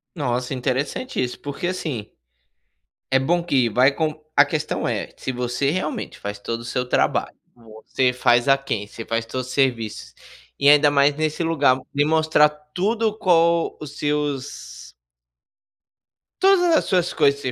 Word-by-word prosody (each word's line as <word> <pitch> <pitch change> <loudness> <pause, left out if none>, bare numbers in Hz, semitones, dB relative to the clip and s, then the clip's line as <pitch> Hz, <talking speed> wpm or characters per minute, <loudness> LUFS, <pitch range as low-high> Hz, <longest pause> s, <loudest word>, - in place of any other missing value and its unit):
Nossa 125 -3 -2
interessante 130 - -2
isso, 125 - -4
porque 145 +5 -4
assim, 145 - -4 1.0
é 130 - +4
bom 170 +5 +1
que 135 -8 +1
vai 130 +5 +4
com 155 0 -2 0.2
a 145 - +8
questão 150 +1 -3
é: - - -3
se - - -5
você 125 +3 -1
realmente 155 -3 -4
faz 100 0 -6
todo 115 +2 -4
o - - -10
seu 125 +1 -3
trabalho, - - 0 0.2
você 115 +2 -2
faz 120 0 +2
aquém, 135 -7 +1
você 115 +2 -9
faz 115 0 -2
todos 130 +2 -5
os 130 - -8
serviços 120 -6 -1 0.5
e 140 - +3
ainda 145 0 +6
mais 140 0 +3
nesse 155 +1 -1
lugar, 145 -6 +3 0.2
me 145 +1 +2
mostrar 155 -1 +4
tudo 195 +9 -2
com 170 -4 +2
os 145 -1 -9
seus 145 - -4 1.5
Todas 355 -4 +4
as - - +2
suas 180 -3 +1
coisas 140 -2 +2
que 130 - -4
140 Hz, 155 wpm, -22 LUFS, 125-160 Hz, 1.5 s, a